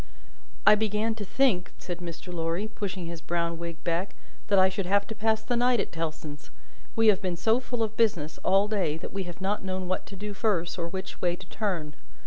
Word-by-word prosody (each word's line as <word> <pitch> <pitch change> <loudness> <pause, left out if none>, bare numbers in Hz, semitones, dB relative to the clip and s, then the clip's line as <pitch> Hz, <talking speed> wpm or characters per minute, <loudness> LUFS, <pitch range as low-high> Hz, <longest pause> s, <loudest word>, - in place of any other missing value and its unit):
"I 210 - +10
began 215 +1 +1
to 220 -1 -5
think," 200 -5 +2
said 175 -1 -5
Mr. 175 +1 -7
Lorry, 165 +4 -1
pushing 195 -4 -4
his 165 -1 -6
brown 170 -1 -1
wig 170 -1 -6
back, 170 +3 -1 0.3
"that 205 -2 +4
I 190 0 +7
should 190 0 -2
have 200 +1 +3
to - - -2
pass 220 0 +1
the 245 - 0
night 245 0 +4
at - - -1
Tellson's. 155 -3 -5 0.5
We 225 -1 +6
have 200 - +4
been 180 -2 -1
so 225 +6 +3
full 245 -2 -2
of 220 0 -2
business 175 -10 +1
all 195 +2 +4
day, 190 -8 0
that - - -7
we 195 -1 -2
have 175 +1 -8
not 195 +1 0
known 185 -1 -2
what 185 - -2
to 200 - -8
do 205 +2 -5
first, 190 -5 0
or 170 - -1
which 190 +2 -6
way 175 -1 +2
to 190 - -11
turn. 180 -7 -2
190 Hz, 220 wpm, -28 LUFS, 170-215 Hz, 0.5 s, I